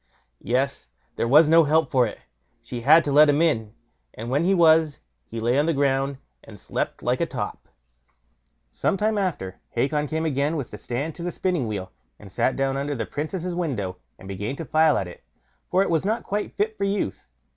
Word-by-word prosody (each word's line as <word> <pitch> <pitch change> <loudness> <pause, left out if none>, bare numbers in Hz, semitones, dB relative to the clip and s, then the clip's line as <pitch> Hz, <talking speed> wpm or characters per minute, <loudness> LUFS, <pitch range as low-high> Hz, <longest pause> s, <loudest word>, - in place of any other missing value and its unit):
Yes! 135 - -1 0.3
there - - -1
was 150 +5 +6
no 165 +1 +6
help 155 -1 +2
for 125 -3 +3
it. - - -9 0.4
She 120 -1 -7
had 155 +6 +6
to 145 - -2
let 150 +2 +7
him 145 +1 +3
in, 115 -10 +1 0.4
and 115 +3 -6
when 145 +5 +1
he 195 +2 +3
was, 160 -3 +4 0.3
he 115 - -6
lay 120 +4 +2
on 150 - +1
the 165 - +1
ground 135 0 +1 0.3
and 105 -3 -13
slept - - -4
like - - 0
a - - +1
top. - - -5 1.0
Some - - 0
time 215 +1 +1
after, 150 - -3
Hacon 150 +5 0
came 160 +2 -2
again 145 +1 0
with 140 -6 -4
the - - -8
stand 140 +6 -3
to 170 - -10
the 175 - -2
spinning 175 -11 -1
wheel, 95 -4 -5 0.3
and 100 -2 -13
sat 130 - +1
down 135 0 0
under 140 +1 -2
the 115 -3 -3
Princess' 175 - -4
window, 125 - -3 0.2
and 95 - -13
began 105 +6 -4
to 165 - -6
file 155 +2 +3
at 95 - -2
it, 90 - -12 0.4
for 185 +2 +3
it - - -2
was 160 -2 +1
not 220 +4 -1
quite 205 +1 -4
fit 215 +1 0
for - - -1
use. 195 - -2
145 Hz, 210 wpm, -24 LUFS, 120-165 Hz, 1.0 s, let